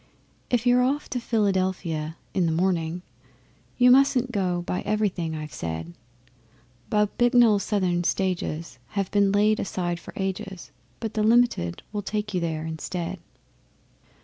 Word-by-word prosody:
If 245 -1 +1
you're 245 0 +5
off 275 +4 0
to 250 - -1
Philadelphia 185 -8 -1 0.2
in 180 -3 +2
the - - +1
morning, 175 0 0 0.7
You 250 0 +6
mustn't 255 -1 +4
go 180 -5 0
by 180 - -2
everything 190 -7 -1
I've 155 -1 -6
said. 80 +1 -5 1.0
Bob 210 -1 +2
Bicknell's 240 -4 +5
Southern 185 -5 0
Stages 170 -3 -2 0.2
have 195 -2 0
been 200 -1 +3
laid 210 +2 +3
aside 175 -3 -2
for - - -12
ages, 190 -1 -4 0.3
But 220 -2 -4
the 215 - 0
Limited 220 - +2
will 205 - -1
take 210 +1 -3
you 180 - +1
there 160 -2 -2
instead. 170 +3 -4
190 Hz, 140 wpm, -25 LUFS, 170-215 Hz, 1.0 s, You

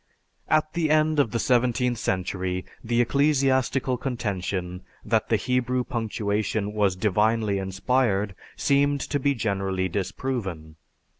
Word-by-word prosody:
At 155 0 +2
the 165 -2 0
end 155 0 +3
of 140 - +3
the 115 - -2
seventeenth 125 0 +1
century, 90 -2 -2 0.2
the 120 +1 +2
ecclesiastical 135 -1 +2
contention 95 -8 -3 0.2
that - - +1
the - - +4
Hebrew 125 0 0
punctuation 105 -2 -2
was 100 -3 +2
divinely 105 +1 +1
inspired 100 +1 0 0.2
seemed 140 0 +2
to 145 - -1
be 140 +1 +1
generally 95 -4 -1
disproven. 95 -5 -4
115 Hz, 120 wpm, -25 LUFS, 95-130 Hz, 0.2 s, the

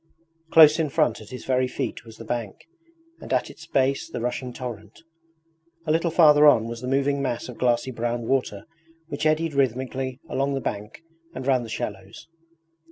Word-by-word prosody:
Close 155 -1 +7
in 155 -2 0
front 120 -4 +1
at 110 - -13
his 125 - -9
very 130 -1 +1
feet - - -4
was 110 -1 -13
the 115 - -10
bank, 115 -3 -5 0.5
and - - -10
at - - 0
its - - -14
base 135 +1 0
the - - -5
rushing 125 +1 -3
torrent. 115 -1 -8 0.8
A 155 - 0
little 165 +2 +1
farther 150 -3 +6
on 115 -6 +5
was 115 0 -6
the 125 - -5
moving 140 +1 +1
mass 125 -3 -3
of 125 - -10
glassy 120 +1 +1
brown 120 0 -3
water 125 -7 -1 0.4
which 150 +1 -1
eddied 155 0 +1
rhythmically 130 0 -1
along 140 +1 -1
the - - -1
bank 105 +4 -6 0.3
and 130 - -6
round 130 -2 +2
the 115 - -9
shallows. 100 +4 -6
130 Hz, 180 wpm, -24 LUFS, 115-140 Hz, 0.8 s, Close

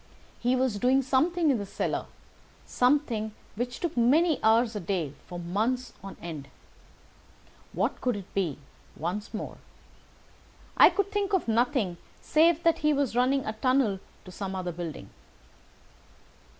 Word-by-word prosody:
He 245 +2 +2
was 255 -5 0
doing 260 +3 +3
something 310 +5 +2
in 250 - +1
the 200 - -4
cellar—something 245 0 -2 0.2
which 245 +3 -3
took 345 -3 -2
many 290 +7 +3
hours 225 +1 +4
a - - -1
day 175 -6 -2
for 175 - -7
months 220 +9 -1
on 195 - -8
end. 155 -5 -7 1.2
What - - -1
could 250 -3 +1
it 200 -3 -9
be, 180 -8 -1 0.4
once 180 +6 -4
more? 215 - -6 1.2
I - - +8
could 400 0 -1
think 410 -1 -1
of 375 - +1
nothing 230 -5 +1 0.2
save 330 +1 +3
that 330 -1 +3
he 300 0 +3
was 275 -5 0
running 260 +2 +2
a 215 - -2
tunnel 240 -3 +1 0.3
to 185 - -10
some 190 0 -5
other 180 -1 -3
building. 165 -3 -7
240 Hz, 140 wpm, -28 LUFS, 195-275 Hz, 1.2 s, I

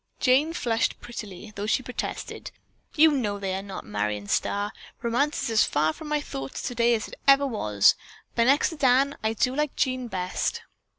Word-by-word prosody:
Jane 275 +6 +3
flushed 230 -8 0
prettily, 215 -3 -8
though 205 +1 -4
she 255 - +1
protested: 250 - -5 0.5
"You 315 0 +6
know 220 -8 -1
they 195 -2 -3
are 190 - -2
not, 195 -1 -8
Marion 105 0 -2
Starr! 205 - 0 0.3
Romance 245 +6 0
is - - -1
as 220 - +5
far 155 +2 +1
from 315 - -10
my 300 0 +1
thoughts 135 - -6
today 240 -1 +2
as 215 - -4
it - - -12
ever 275 0 +6
was, 105 - +3 0.4
but 230 - +2
next 275 +3 +4
to 320 - -8
Dan, 275 0 +3
I 220 +1 +1
do 250 +4 0
like 300 -1 -1
Jean 255 -1 0
best." 185 -4 -2
235 Hz, 185 wpm, -26 LUFS, 200-275 Hz, 0.5 s, You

